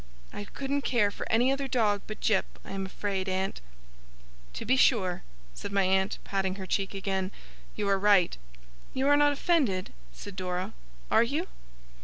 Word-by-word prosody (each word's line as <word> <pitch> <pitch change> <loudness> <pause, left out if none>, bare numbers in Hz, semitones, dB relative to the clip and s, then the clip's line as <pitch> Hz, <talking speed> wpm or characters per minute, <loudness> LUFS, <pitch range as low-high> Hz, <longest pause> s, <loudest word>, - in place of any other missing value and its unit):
I 205 - -5
couldn't 280 +5 -2
care 235 -7 +2
for - - -6
any 245 +4 +4
other 275 0 -1
dog 215 -6 +2
but 215 - -6
Jip, 210 -4 +1
I - - -8
am 195 -1 -3
afraid, 195 -1 -2
aunt.' 190 - -2 0.9
'To - - -5
be 255 - +4
sure!' 195 -9 +3 0.3
said - - -6
my 200 -1 +3
aunt, 190 +2 +2
patting 190 -1 -1
her 190 -1 -6
cheek 195 +1 -1
again. 190 -1 -1 0.5
'You 210 -1 -1
are 195 -1 +3
right.' 200 -3 +4 0.6
'You 265 +1 +1
are 290 - +7
not 290 0 +5
offended,' 275 - +1 0.2
said 195 - -9
Dora. 180 -1 -3 0.4
'Are - - +6
you? 285 +9 0
200 Hz, 170 wpm, -29 LUFS, 190-255 Hz, 0.9 s, are